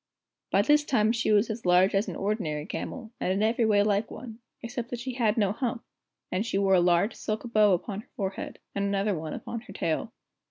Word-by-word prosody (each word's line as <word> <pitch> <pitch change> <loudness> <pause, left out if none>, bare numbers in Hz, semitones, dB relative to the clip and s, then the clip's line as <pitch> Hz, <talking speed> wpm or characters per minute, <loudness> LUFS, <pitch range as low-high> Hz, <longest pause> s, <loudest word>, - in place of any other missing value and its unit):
By 200 - +3
this 295 +5 +4
time 220 -6 +2
she 235 -2 0
was 210 +1 +3
as 225 +1 -6
large 180 +3 +4
as 195 +2 +1
an - - -4
ordinary 180 -8 -2
camel, 225 +5 -6
and 185 - 0
in 195 +3 +1
every 225 +1 +2
way 205 -1 +4
like 205 +1 +1
one, 230 -2 -9 0.2
except 240 0 -5
that 245 - -4
she 255 +1 -4
had 230 -3 +1
no 200 -3 +3
hump, 230 0 -3 0.5
and 185 +3 0
she 230 - -2
wore 195 -1 +3
a 185 - +6
large 175 +5 +3
silk 215 0 -3
bow 210 -2 +5
upon 195 +3 -2
her - - -25
forehead, 195 -2 -4 0.2
and 200 - -1
another 200 +1 +1
one 155 -1 -5
upon 235 - -6
her - - -12
tail. 165 +7 -2
210 Hz, 225 wpm, -28 LUFS, 195-230 Hz, 0.5 s, a